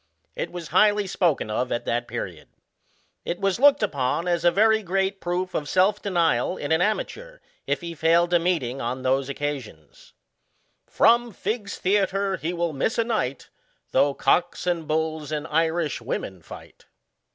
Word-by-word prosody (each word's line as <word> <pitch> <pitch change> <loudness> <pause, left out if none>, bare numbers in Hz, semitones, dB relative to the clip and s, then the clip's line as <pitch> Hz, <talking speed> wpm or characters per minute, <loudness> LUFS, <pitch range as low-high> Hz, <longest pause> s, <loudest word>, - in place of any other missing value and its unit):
It - - -4
was 175 -3 -7
highly 210 -1 +4
spoken 165 - 0
of 125 +4 -1
at 120 - -2
that 120 +1 -1
period. - - -6 0.8
It 175 - -3
was 195 +2 0
looked 285 -2 +5
upon 150 -1 -1
as 170 -1 0
a 175 - +6
very 220 +4 +3
great 195 +1 -1
proof 180 +1 -2
of 145 - -3
self 195 +3 +3
denial 170 -10 +1
in 145 - -4
an 160 +1 +3
amateur, - - -2 0.3
if - - 0
he 170 -1 -6
failed 165 +2 +2
a 175 - +5
meetings 155 -7 -1
on 125 +2 -3
those 135 +1 +1
occasions: 135 - -6 0.4
" - - -45
From 235 0 +4
Figg's 210 0 -4
theatre 195 0 0
lie 165 - -1
will 170 -2 -1
miss 150 - -1
a 230 - +3
night 210 - -3 0.4
Though 140 -1 +3
cocks, 175 0 +1
and 170 -3 -1
hulls, 155 -1 -1
and 150 -1 -2
Irish 160 -3 0
women 95 -6 -4
fight." - - -13
170 Hz, 165 wpm, -24 LUFS, 145-195 Hz, 0.8 s, a